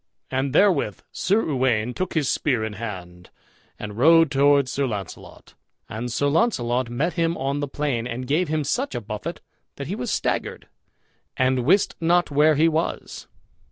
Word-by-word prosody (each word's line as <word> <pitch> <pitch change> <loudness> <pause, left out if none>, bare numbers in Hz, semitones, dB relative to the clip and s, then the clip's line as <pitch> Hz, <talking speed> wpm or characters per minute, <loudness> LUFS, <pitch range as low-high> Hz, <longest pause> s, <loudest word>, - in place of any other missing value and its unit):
And 135 +1 -1
therewith 150 - +2
Sir 205 +4 +1
Uwaine 125 -5 0
took 185 +4 -4
his 150 -4 +1
spear 125 -7 0
in 110 -1 -4
hand, 90 -5 -8 0.5
and 105 +1 -7
rode 165 +3 +6
toward 140 -1 +4
Sir 140 +1 -1
Launcelot; 100 -6 -8 0.3
and 115 +2 -5
Sir 145 - 0
Launcelot 130 - +1
met 145 +9 -1
him 170 -1 0
on 140 +2 -2
the 145 - -2
plain 135 -5 -2
and 125 +1 -5
gave 155 +7 +1
him 155 0 -1
such 260 - -2
a - - -1
buffet 105 0 -6 0.3
that - - -6
he - - -4
was - - -4
staggered, - - -2 0.7
and 130 -1 +1
wist 190 +7 +3
not 175 0 +2
where 150 +2 +4
he 155 +3 +4
was. 165 +1 -3
140 Hz, 165 wpm, -23 LUFS, 120-160 Hz, 0.7 s, rode